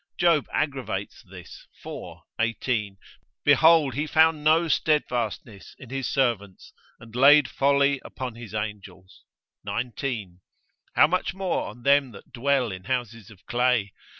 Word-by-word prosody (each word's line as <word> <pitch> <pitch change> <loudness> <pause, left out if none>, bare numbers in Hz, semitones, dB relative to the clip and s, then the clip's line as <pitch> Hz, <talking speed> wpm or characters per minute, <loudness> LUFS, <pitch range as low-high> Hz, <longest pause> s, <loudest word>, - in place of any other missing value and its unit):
Job 170 -4 +3
aggravates 140 -4 -3
this, - - -13 0.2
iv. - - -8 0.2
18, 115 -3 -1 0.5
Behold 155 -1 +5
he 145 +5 -2
found 160 0 +3
no 160 +2 +3
steadfastness 120 -9 -1
in 125 -2 -13
his 135 -1 -3
servants, 115 -8 -2 0.3
and 115 0 -14
laid 140 +2 +6
folly 140 0 +2
upon 130 -2 -6
his 115 -2 -10
angels; 100 -3 -7 0.4
19. 115 -6 -4 0.6
How - - +7
much 185 +4 -1
more 190 -1 -2
on 120 - -11
them 140 0 +3
that 100 - -15
dwell 130 -2 0
in 95 0 -9
houses 120 -5 -4
of 100 -3 -18
clay? 120 -4 +1
125 Hz, 130 wpm, -25 LUFS, 110-145 Hz, 0.6 s, How